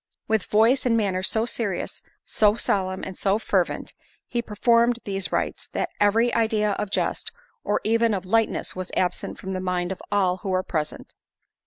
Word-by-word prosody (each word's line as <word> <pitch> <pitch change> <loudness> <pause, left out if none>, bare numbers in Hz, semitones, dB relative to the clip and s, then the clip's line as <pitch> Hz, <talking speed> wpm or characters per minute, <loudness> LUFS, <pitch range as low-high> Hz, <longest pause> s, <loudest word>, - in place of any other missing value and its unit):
With 220 -3 +1
voice 230 +5 +3
and 230 -1 +3
manners 190 -3 +1
so 220 0 0
serious, 215 -6 -3 0.2
so 210 -1 +3
solemn 190 -4 0
and 190 - -6
so 195 +2 +1
fervent, 225 - -1 0.3
he 240 - -1
performed 235 +2 +3
these 195 -2 -2
rites, - - -2
that - - -1
every 225 +4 +3
idea 220 -2 +2
of 210 0 -2
jest, - - -1 0.3
or 205 - +1
even 230 0 +2
of 190 -1 -4
lightness, 225 +3 +1
was 185 0 -4
absent 180 - -1
from 190 0 -5
the 185 - -2
mind 180 -1 -1
of 190 - -5
all 185 -3 +2
who 190 - -6
were 185 0 +1
present. 155 -5 -4
205 Hz, 175 wpm, -24 LUFS, 185-225 Hz, 0.3 s, voice